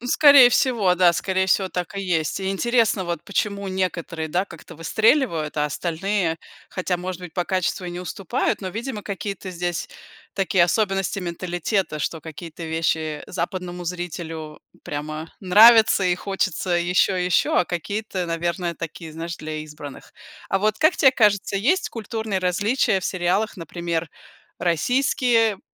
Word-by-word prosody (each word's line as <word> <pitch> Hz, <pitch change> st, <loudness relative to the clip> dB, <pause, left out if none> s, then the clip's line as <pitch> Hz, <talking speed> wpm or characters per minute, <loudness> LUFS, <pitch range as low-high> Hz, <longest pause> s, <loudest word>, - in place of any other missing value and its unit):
Ну, 245 Hz, -, -7 dB
скорее 280 Hz, -2 st, +8 dB
всего, 235 Hz, -8 st, +2 dB
да. 180 Hz, -1 st, +5 dB
Скорее 190 Hz, +2 st, 0 dB
всего, 190 Hz, 0 st, +2 dB
так 180 Hz, +2 st, -4 dB
и -, -, -2 dB
есть. 165 Hz, -5 st, 0 dB
И 190 Hz, 0 st, -1 dB
интересно 225 Hz, -1 st, +1 dB
вот 170 Hz, -2 st, -4 dB
почему 200 Hz, 0 st, -2 dB
некоторые, 170 Hz, -4 st, -3 dB
да, 180 Hz, +5 st, 0 dB
как-то 170 Hz, -5 st, -13 dB
выстреливают, 170 Hz, -, +1 dB
а 150 Hz, -, +1 dB
остальные, 170 Hz, +3 st, -1 dB, 0.3 s
хотя, 185 Hz, -1 st, -1 dB
может 180 Hz, 0 st, -5 dB
быть, 175 Hz, -3 st, -9 dB
по 180 Hz, -, 0 dB
качеству 185 Hz, 0 st, -1 dB
и 175 Hz, -, -4 dB
не 175 Hz, -, -6 dB
уступают, 180 Hz, +2 st, -2 dB
но, 190 Hz, -, -4 dB
видимо, 225 Hz, +2 st, -5 dB
какие-то 195 Hz, -1 st, -5 dB
здесь 175 Hz, -1 st, -3 dB, 0.5 s
такие 190 Hz, -2 st, +2 dB
особенности 195 Hz, +1 st, +1 dB
менталитета, 175 Hz, 0 st, -2 dB
что 160 Hz, +2 st, -3 dB
какие-то 165 Hz, +2 st, -9 dB
вещи 160 Hz, -1 st, -1 dB
западному 180 Hz, 0 st, -4 dB
зрителю 165 Hz, -3 st, -6 dB, 0.2 s
прямо 155 Hz, +2 st, -5 dB
нравятся 215 Hz, +1 st, +7 dB
и 180 Hz, -, +3 dB
хочется 190 Hz, -1 st, -2 dB
еще 180 Hz, +2 st, +2 dB
и -, -, 0 dB
еще, 180 Hz, -, +2 dB
а -, -, +1 dB
какие-то, 190 Hz, +2 st, -3 dB
наверное, 170 Hz, +1 st, -2 dB
такие, 165 Hz, -1 st, -7 dB
знаешь, 165 Hz, +1 st, -5 dB
для 155 Hz, 0 st, -6 dB
избранных. 150 Hz, -2 st, -11 dB, 0.4 s
А -, -, +1 dB
вот 215 Hz, 0 st, +1 dB
как 315 Hz, +3 st, +4 dB
те 270 Hz, -4 st, +6 dB
кажется, 205 Hz, -5 st, +2 dB
есть 310 Hz, -, +1 dB
культурные 220 Hz, -2 st, -3 dB
различия 205 Hz, +4 st, +1 dB
в -, -, -7 dB
сериалах, 185 Hz, +4 st, 0 dB
например, 170 Hz, -1 st, -3 dB, 0.5 s
российские 225 Hz, -, +2 dB
180 Hz, 150 wpm, -23 LUFS, 170-205 Hz, 0.5 s, скорее